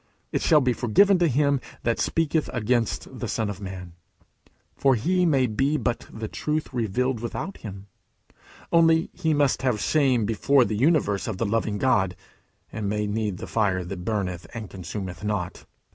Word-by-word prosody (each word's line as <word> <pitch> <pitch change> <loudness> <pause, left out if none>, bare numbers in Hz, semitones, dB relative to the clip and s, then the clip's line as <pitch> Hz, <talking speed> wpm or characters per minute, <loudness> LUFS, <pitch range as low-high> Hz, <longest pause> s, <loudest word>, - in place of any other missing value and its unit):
"It - - 0
shall 155 -3 +5
be 130 -1 +2
forgiven 180 - +4
to 175 - +4
him 140 -1 +2 0.2
that 115 -1 0
speaketh 160 -1 0
against 120 0 -1
the - - -3
Son 110 -2 -1
of 100 0 -9
man;" 95 -3 -7 0.8
for 135 -2 +3
He 180 +10 +2
may 135 -5 +3
be 135 +7 +1
but 120 -4 -2
the 110 0 -5
truth 150 +4 -3
revealed 125 +2 0
without 120 - -5
him. 100 -2 -9 0.9
Only 165 -1 +4
he 160 -1 0
must 145 -2 +2
have 125 -5 +1
shame 130 -6 +2
before 120 +5 +3
the 110 - -2
universe 125 - +2
of 110 -4 -3
the 115 - -1
loving 110 0 0
God, 100 -7 +2 0.6
and 105 -2 -3
may 105 +1 -1
need 105 -2 -2
the - - -6
fire 100 -5 0
that 90 0 -6
burneth 95 -5 -2
and 110 -3 -6
consumeth 95 +1 -6
not. 100 -4 -3
115 Hz, 170 wpm, -25 LUFS, 105-140 Hz, 0.9 s, shall